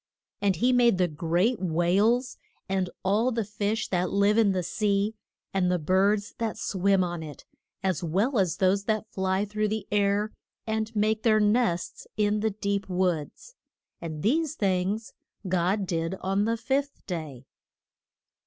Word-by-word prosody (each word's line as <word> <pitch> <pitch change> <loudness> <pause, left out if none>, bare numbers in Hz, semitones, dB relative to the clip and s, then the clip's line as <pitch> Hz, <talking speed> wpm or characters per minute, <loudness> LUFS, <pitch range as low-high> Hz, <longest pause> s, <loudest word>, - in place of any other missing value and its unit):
And 200 -2 +2
he 245 +10 +2
made 240 -5 +4
the 180 -1 +3
great 175 +9 0
whales, 195 +9 +1 0.3
and 190 -2 0 0.2
all 215 +6 +2
the 225 -3 -1
fish 210 +2 -2
that 180 -1 0
live 200 +1 +3
in 220 -3 +4
the 185 -1 -1
sea, 205 +2 0 0.4
and 180 -2 +2
the 180 - +2
birds 195 +5 +1
that 225 -2 -2
swim 195 0 +1
on 175 -2 -3
it, 150 -3 -9 0.4
as 185 -4 0
well 200 - +1
as 180 -4 +1
those 195 +1 +2
that 215 0 0
fly 190 +1 0
through 210 +1 -1
the 215 -1 -3
air, 205 +1 +1 0.3
and 220 0 -2
make 215 +1 +1
their 220 -1 +4
nests 210 -4 0
in 210 0 +2
the 220 +1 +1
deep 200 -1 -2
woods. 180 - -2 0.5
And 155 -3 -6
these 310 +6 +1
things 195 0 -1 0.3
God 185 +3 +1
did 165 0 -2
on 195 +2 +1
the 230 +1 0
fifth 275 +4 -2
day. 155 - -6
200 Hz, 155 wpm, -27 LUFS, 180-220 Hz, 0.5 s, made